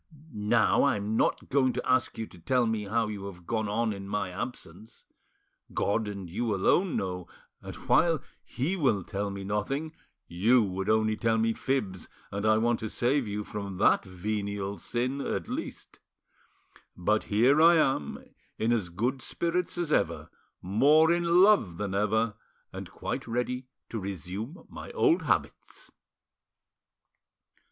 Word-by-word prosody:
Now 110 +4 +3
I'm 105 -5 0
not - - +1
going 130 -2 +2
to 125 - -4
ask 130 -1 +1
you 110 - -3
to 90 - -16
tell 125 +8 +1
me 110 -2 -1
how 115 +3 +1
you 100 -2 -6
have 90 -3 -11
gone 110 0 -1
on 110 +1 0
in 100 -1 -8
my 100 -2 -2
absence. 105 0 -7 0.7
God 105 +2 0
and 100 -3 -6
you 110 +4 -1
alone 170 - +2
know, 90 -2 -3 0.3
and - - -8
while 165 -2 +2 0.2
He 145 +10 -2
will 130 - +1
tell 100 +3 -3
me 100 0 -6
nothing, 135 +11 -2 0.3
you 110 +8 +3
would 95 -1 -3
only 110 0 +3
tell 115 0 +1
me 115 0 +2
fibs, 105 -10 -2 0.2
and 100 +2 -2
I 110 0 +5
want 120 +1 +1
to 110 - -4
save 130 +1 +1
you 105 +1 -3
from 100 -2 -6
that 100 - +4
venial 100 +1 -4
sin 130 +4 -2
at - - -3
least. - - -6 1.0
But 105 +5 +1
here 125 +9 +4
I 170 +1 +7
am, 135 - 0 0.3
in 115 +2 +1
as 105 -7 -1
good 120 +10 -2
spirits 170 +6 -2
as 170 -3 -1
ever, - - 0 0.3
more 145 - +4
in 170 +1 +4
love 195 - +4
than 100 -1 -3
ever, 105 +2 +1 0.4
and - - -7
quite - - -5
ready 125 +2 -2 0.2
to 115 - -4
resume 100 - -6
my - - -9
old 375 -8 +3
habits." - - -2
110 Hz, 155 wpm, -28 LUFS, 100-130 Hz, 1.0 s, I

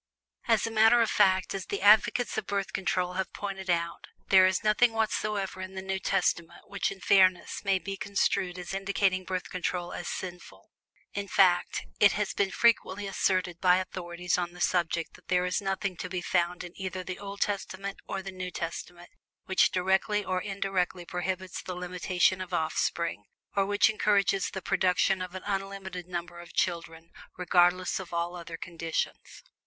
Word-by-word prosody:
As - - +3
a 225 - -3
matter 225 +2 +6
of 225 - -1
fact, 190 -2 +3
as 195 -1 -5
the 200 - -3
advocates 215 +4 +5
of - - -3
Birth 200 -1 -2
Control 180 -1 0
have 190 +1 -2
pointed 195 -2 -5
out, 170 -1 -1 0.2
there 190 -1 +7
is 185 - 0
nothing 220 +2 +4
whatsoever 210 -3 -1
in 185 0 -7
the 190 - -4
New 190 0 -2
Testament 175 -3 -1
which 200 - -1
in 195 - -8
fairness 185 -1 +3
may 195 -1 +3
be 195 +1 -5
construed 190 -3 0
as 180 +1 -6
indicating 195 -1 0
Birth 185 -1 -4
Control 180 -1 -3
as 175 - -5
sinful; 175 - -7 0.4
in 200 0 -3
fact, 185 -3 +3
it 200 - +6
has 210 -1 -1
been 200 -1 +1
frequently 205 -2 +2
asserted 185 -3 0
by 180 -1 +5
authorities 180 -1 -2
on 175 -1 -3
the 180 - -12
subject 170 -2 0
that - - -18
there 180 0 +2
is 180 +3 0
nothing 195 -1 -2
to 180 - -5
be 180 0 -2
found 175 0 0
in 175 -1 -9
either 185 -1 -4
the 185 +1 -6
Old 200 0 -8
Testament 200 -1 -2
or 195 -1 -4
the 195 - -6
New 185 -1 -5
Testament 175 +1 -6 0.3
which 190 - +4
directly 190 +3 +1
or 185 0 -1
indirectly 190 -3 -2
prohibits 185 +1 -3
the 185 - -6
limitation 180 +1 +1
of 185 - -3
offspring, 160 -6 -1 0.3
or 195 -1 +2
which 205 0 +4
encourages 205 -2 +2
the 190 - -6
production 185 +1 +2
of 185 0 -6
an 185 - -6
unlimited 195 -2 -4
number 175 -1 -5
of 175 -1 -12
children 165 -1 -2 0.3
regardless 180 +1 +3
of 185 -2 -8
all 170 +1 -2
other 170 -1 -7
conditions. 165 -2 -4
185 Hz, 175 wpm, -29 LUFS, 180-195 Hz, 0.4 s, there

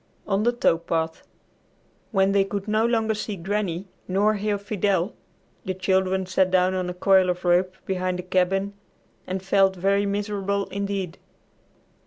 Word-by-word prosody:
X - - -22
ON 195 0 +2
THE 240 +3 +3
TOW 240 -8 +2
PATH 165 -1 -2 0.9
When 195 -2 +2
they 200 0 +4
could 200 +1 -4
no 215 +2 +2
longer 225 -2 +1
see 210 0 -4
Granny, 190 0 -2 0.2
nor 200 +3 +2
hear 205 0 -1
Fidel, 200 -2 0 0.5
the 185 - -3
children 190 0 +1
sat 185 0 +2
down 185 0 +3
on 185 -1 -2
a - - -3
coil 190 0 +4
of 180 0 -2
rope 180 +1 +2
behind 185 -1 -1
the 180 - -5
cabin 185 +2 0 0.5
and 185 0 -3
felt 195 0 +3
very 200 +2 +1
miserable 200 -1 -1
indeed. 200 -3 -3
195 Hz, 160 wpm, -24 LUFS, 185-200 Hz, 0.9 s, they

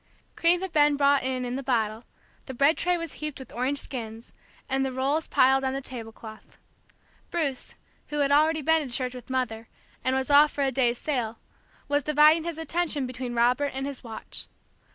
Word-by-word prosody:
Cream 345 +1 +3
had 380 -2 -4
been 295 -1 +4
brought 280 0 +4
in 255 -1 -2
in 245 +1 -3
the - - -4
bottle, 225 -4 -1 0.4
the 265 - -6
bread 280 +6 +4
tray 360 0 +1
was 335 -3 -5
heaped 305 -2 -4
with 265 -2 -11
orange 255 +4 -1
skins, 230 -4 -4 0.3
and 270 0 0
the 265 - -1
rolls 275 +5 -1
piled 265 +1 +4
on 265 0 0
the 270 - -2
tablecloth. 225 -3 -6 0.7
Bruce, 285 -7 -3 0.3
who 295 - -4
had 280 0 +2
already 310 +1 +3
been 320 +2 +3
to 270 -4 -6
church 250 +1 -1
with 250 -1 -11
Mother, 235 -4 -2 0.4
and 260 0 +1
was 265 +2 -1
off 295 +1 +7
for 285 - -1
a 270 - +1
day's 245 -2 +2
sail, 240 -7 -2 0.5
was 290 0 +1
dividing 305 +3 +4
his 340 -2 -4
attention 325 -3 -1
between 250 -1 -5
Robert 250 +4 +2
and 270 0 -3
his 280 -2 -7
watch. 225 -2 -8
270 Hz, 195 wpm, -26 LUFS, 250-295 Hz, 0.7 s, off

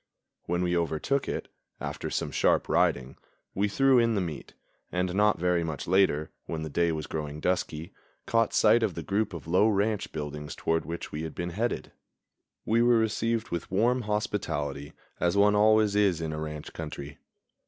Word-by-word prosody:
When 90 +1 0
we 90 0 +1
overtook 85 - 0
it, - - -3 0.3
after - - -4
some - - -2
sharp - - +2
riding, 65 +1 +1 0.4
we 100 +2 +1
threw 135 +4 +4
in 115 -1 +2
the - - +1
meat, 85 -6 -5 0.4
and 90 0 -1
not 105 +1 +3
very 90 -1 +1
much 80 -4 -4
later, 90 -5 +2 0.2
when 80 -1 -3
the 80 - -5
day 85 +2 +2
was 80 -1 -3
growing 75 -1 -5
dusky, 85 -2 -2 0.3
caught 115 -1 +2
sight 110 +2 +5
of 110 -6 0
the 85 - -5
group 100 +5 0
of 85 -7 -8
low 90 +6 +3
ranch 105 0 0
buildings 75 -1 -5
toward 80 -2 0
which 85 +2 -6
we 75 - -4
had 80 -1 -6
been 85 0 -3
headed. 115 +7 -2 0.7
We 115 +2 +3
were 120 0 +5
received 115 +1 0
with 85 - -4
warm 120 +7 +2
hospitality, 105 -10 -2 0.3
as 90 +3 +1
one 105 +1 +5
always 105 0 +4
is 100 -5 +3
in 80 -1 -3
a 75 - -4
ranch 75 -1 -6
country. 75 -2 -7
90 Hz, 180 wpm, -28 LUFS, 80-105 Hz, 0.7 s, sight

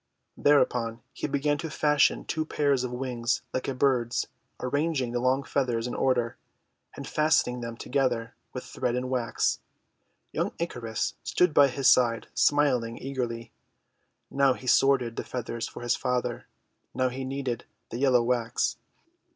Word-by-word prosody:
Thereupon 120 -5 +2
he - - -3
began 145 +1 0
to 160 +1 -4
fashion 150 -1 +2
two 160 - -1
pairs 140 -4 +1
of 125 - -2
wings 125 -1 -2
like 130 - -2
a 135 - -2
bird's, 125 -3 +1 0.3
arranging 145 -1 0
the 120 - -1
long 130 +2 +2
feathers 125 -4 -1
in 125 - -3
order, 120 -3 +1 0.6
and - - -7
fastening 150 -5 +2
them 115 -1 -6
together 125 -4 -1 0.2
with 125 - -6
thread 120 -1 -2
and 125 +1 -2
wax. 120 -3 0 0.7
Young - - -1
Icarus 120 -10 -3
stood 180 -3 +2
by 145 -1 +7
his 135 0 0
side, 115 -2 +4
smiling 130 -6 +2
eagerly. 120 -4 -4 0.8
Now 140 -1 +4
he 130 - -11
sorted 130 -2 +3
the - - -2
feathers 115 -2 -4
for - - -9
his 120 +1 +2
father, 125 -1 -2 0.5
now 130 0 +2
he 130 +2 -5
kneaded 130 -3 -3 0.3
the 120 - -4
yellow 130 -3 +4
wax. 120 -1 0
125 Hz, 150 wpm, -27 LUFS, 120-140 Hz, 0.8 s, by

